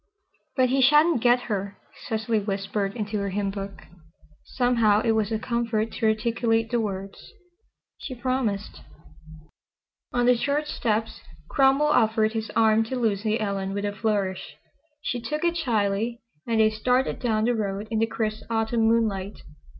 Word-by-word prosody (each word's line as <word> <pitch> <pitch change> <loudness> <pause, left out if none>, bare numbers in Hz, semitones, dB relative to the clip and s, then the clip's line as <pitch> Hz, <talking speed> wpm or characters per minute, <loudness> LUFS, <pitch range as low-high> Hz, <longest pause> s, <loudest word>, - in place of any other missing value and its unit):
"But 255 -2 +3
he 265 +1 +2
sha'n't 300 +1 +5
get 245 +1 +4
her," 200 -3 -4 0.3
Cecily 220 -1 0
whispered 200 0 -2
into 210 -2 -3
her 200 0 -2
hymnbook. 195 0 -4 0.6
Somehow 235 -5 +2
it 225 - +2
was 220 -1 0
a 220 - +1
comfort 230 -1 -1
to 225 - -1
articulate 225 +1 +1
the 240 - +2
words, 195 -2 -6 0.7
"She 260 - -6
promised." 240 -5 -2 1.3
On 245 -1 +1
the 250 0 +5
church 285 +5 0
steps 225 -6 -2 0.3
Cromwell 275 +1 +4
offered 220 -5 +2
his 225 -1 -3
arm 220 -1 +4
to 260 - -4
Lucy 220 -2 0
Ellen 195 -2 -2
with 200 0 -2
a 205 - -1
flourish. 200 -3 -2 0.5
She 245 - -2
took 300 +7 -3
it 340 0 +1
shyly, 230 -5 0 0.3
and 230 -1 +1
they 215 0 +5
started 250 +4 0
down 220 -4 0
the 245 - +2
road 205 -2 -3
in 220 - 0
the 225 - +2
crisp 220 -1 -3
Autumn 225 0 +1
moonlight. 210 -4 0
225 Hz, 150 wpm, -25 LUFS, 205-245 Hz, 1.3 s, sha'n't